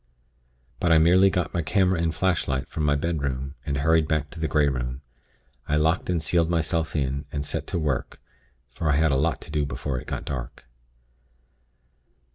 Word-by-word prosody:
"But 85 - +1
I 80 - +7
merely 90 +4 +6
got 90 -3 -1
my 85 - 0
camera 90 +3 +2
and 85 -1 +1
flashlight 80 -7 0
from 75 - -4
my 75 0 +3
bedroom, 70 -4 -2
and 70 -2 -1
hurried 80 +2 +3
back 75 -2 -1
to 80 - -9
the 80 - 0
Grey 75 0 +3
Room. 65 0 -3 0.6
I 75 - +1
locked 80 +5 +1
and 90 -2 +1
sealed 85 +1 +1
myself 80 -1 0
in, 70 0 -1
and 70 -1 -3
set - - -3
to - - -2
work, 75 -6 -2 0.5
for 75 +5 -3
I 75 - +3
had 80 0 +3
a - - +2
lot 80 +5 0
to 80 - -9
do 75 -1 0
before 65 -1 -3
it - - -12
got - - -4
dark. 65 -4 -6
75 Hz, 190 wpm, -25 LUFS, 70-85 Hz, 0.6 s, I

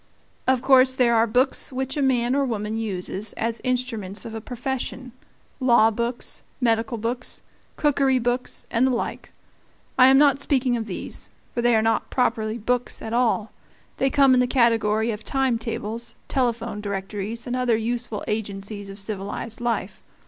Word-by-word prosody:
Of 260 -1 +3
course 260 -1 +6
there 240 -2 +4
are 225 +1 +4
books 255 +6 +1
which 265 0 -3
a 290 - 0
man 250 -2 +2
or 280 0 +2
woman 215 -4 -2
uses 205 -1 -3
as 230 +1 -3
instruments 235 -6 -2
of 225 - -6
a 225 - -5
profession 255 +1 -4 0.5
law 235 -4 +5
books, 235 +2 -3 0.2
medical 230 -2 +1
books, 240 +3 -4 0.3
cookery 275 -3 +2
books, 245 +1 -2
and 245 +2 +3
the 255 - +1
like. 235 - -4 0.7
I 255 - +9
am 265 0 +7
not 280 -1 +5
speaking 260 -3 +1
of 230 -2 -2
these, 185 - -4 0.2
for 240 - -1
they 240 -1 +4
are 220 - +3
not 225 0 +1
properly 220 -3 0
"books" 245 +2 -1
at 220 - -6
all; 230 -3 +1 0.5
they 270 - +2
come 270 -1 +5
in 255 - +5
the 250 - +3
category 230 -3 +2
of 210 0 -6
time 260 +1 +1
tables, 230 0 -4
telephone 235 -4 -1
directories, 200 +3 -4
and 250 -1 -2
other 250 -3 +2
useful 230 -1 -3
agencies 200 -1 -4
of 195 - -8
civilized 205 +3 -4
life. 230 -5 -2
235 Hz, 165 wpm, -24 LUFS, 220-255 Hz, 0.7 s, I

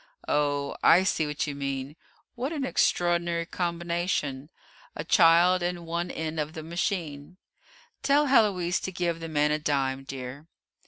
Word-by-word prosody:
Oh, 145 -1 0
I 180 +3 +6
see 160 -5 0
what 150 0 -2
you 145 - -4
mean; 140 0 -4 0.4
what 260 +3 -3
an 290 -5 -2
extraordinary 175 -6 +1
combination 170 -5 -2 0.5
a - - -4
child 175 0 +5
in 175 -1 -3
one 170 +1 -3
end 160 0 -4
of 150 +1 -3
the 160 -2 -7
machine! 170 -2 -3 0.6
Tell 290 +1 +3
Héloise 200 -9 +3
to 190 - -4
give 170 -2 -2
the 165 0 -6
man 150 -1 +2
a 150 - 0
dime, 135 -3 -1
dear." 135 +2 -8
165 Hz, 150 wpm, -27 LUFS, 145-175 Hz, 0.6 s, I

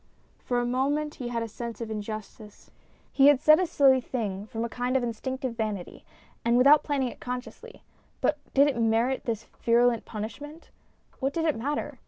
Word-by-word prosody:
For 245 -1 0
a 240 - -1
moment 285 +5 0
he 245 - -3
had 235 -1 -2
a - - -4
sense 230 0 -7
of 230 -2 -5
injustice; 215 0 -8 0.4
he 275 0 +6
had 290 -2 +6
said 305 +3 +6
a 370 - +1
silly 270 -5 +4
thing, 210 -5 -4
from 225 0 -3
a - - -2
kind 245 +2 -1
of 255 - -1
instinctive 255 +2 -4
vanity 215 -5 -4 0.4
and 235 +1 +3
without 280 +4 +7
planning 275 -4 -1
it - - -12
consciously, 250 +1 -7 0.4
but - - +1 0.2
did 280 +1 +6
it 285 - 0
merit 230 +4 +1
this 230 -2 -2 0.2
virulent 235 0 +3
punishment? 290 +9 -8 0.5
What 270 0 -1
did 330 +1 -1
it 310 - +2
matter? 280 +6 -3
245 Hz, 185 wpm, -27 LUFS, 225-275 Hz, 0.5 s, without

